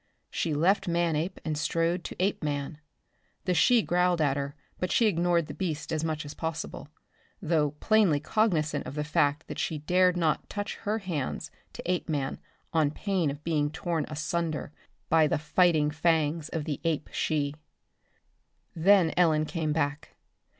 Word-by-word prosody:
She 160 -3 -1
left 190 +5 +2
Manape 170 0 0
and 155 -1 -1
strode 165 +3 0
to - - -5
Apeman. 150 -6 -1 0.7
The 185 - +2
she 230 +7 +4
growled 180 0 +2
at 145 -3 +2
her 140 0 -3 0.2
but 180 - -1
she 235 - +4
ignored 175 -4 +2
the 145 - -7
beast 160 -4 -3
as 160 0 -1
much 155 -1 -2
as 145 - -7
possible, 160 -2 -5 0.5
though 155 -4 +1
plainly 210 -9 +4
cognizant 155 - 0
of 130 - -7
the 150 - -1
fact 150 +1 +1
that - - -6
she 160 - -1
dared 180 +4 +3
not 160 -3 0
touch 205 0 -4
her 215 0 -1
hands 175 -10 -4 0.2
to - - -8
Apeman 155 -6 -1 0.3
on 155 -3 +3
pain 180 0 -1
of 145 +2 -6
being 150 -3 +1
torn 165 -1 -2
asunder 155 -1 -2 0.4
by 160 -1 +4
the - - +1
fighting 150 0 +3
fangs 160 -1 +1
of 160 -2 -3
the 145 -3 -3
ape 160 -3 -1
she. 145 -3 0 1.2
Then 175 0 +4
Ellen 155 -3 +4
came 155 -1 -2
back. 150 -1 -2
160 Hz, 155 wpm, -28 LUFS, 150-175 Hz, 1.2 s, she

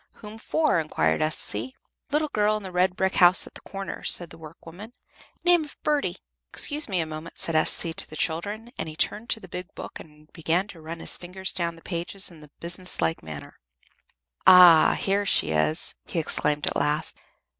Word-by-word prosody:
"Whom 215 +1 -11
for?" 305 - +1
inquired 155 0 0
S.C. 130 -6 -2 0.3
"Little 300 +2 0
girl 210 0 +2
in 210 - -9
the 190 - -7
red 180 +1 +1
brick 190 0 -1
house 180 0 +5
at - - -14
the - - -9
corner," 195 -1 -7
said 175 -2 +1
the 165 - -10
workwoman; 165 +7 -12 0.5
"name 350 -2 +5
of 295 - -13
Birdie." 285 -12 0 0.3
"Excuse 295 -3 +3
me 190 -3 0
a - - -2
moment," 155 +1 -9
said 165 - 0
S.C. 165 +1 +4
to 195 - -1
the 155 - -9
children, 205 +9 -2
and - - -3
he 155 - -10
turned 215 +7 0
to - - +1
the 185 - -12
big 180 +1 -8
book - - -8
and 150 0 -16
began 170 +3 0
to 165 - -12
run 165 +1 -8
his - - 0
fingers 185 +1 -5
down 170 -2 -3
the 165 - -17
pages 180 +2 -2
in 160 -3 -14
a 150 - -15
business 175 +2 -4
like 165 - 0
manner. 80 -2 -10 0.9
"Ah! 180 -3 +8
here 200 +1 +1
she 80 - +2
is!" 80 - 0
he - - -6
exclaimed 150 -2 +1
at - - +1
last. 150 +1 -1
175 Hz, 200 wpm, -25 LUFS, 160-200 Hz, 0.9 s, Ah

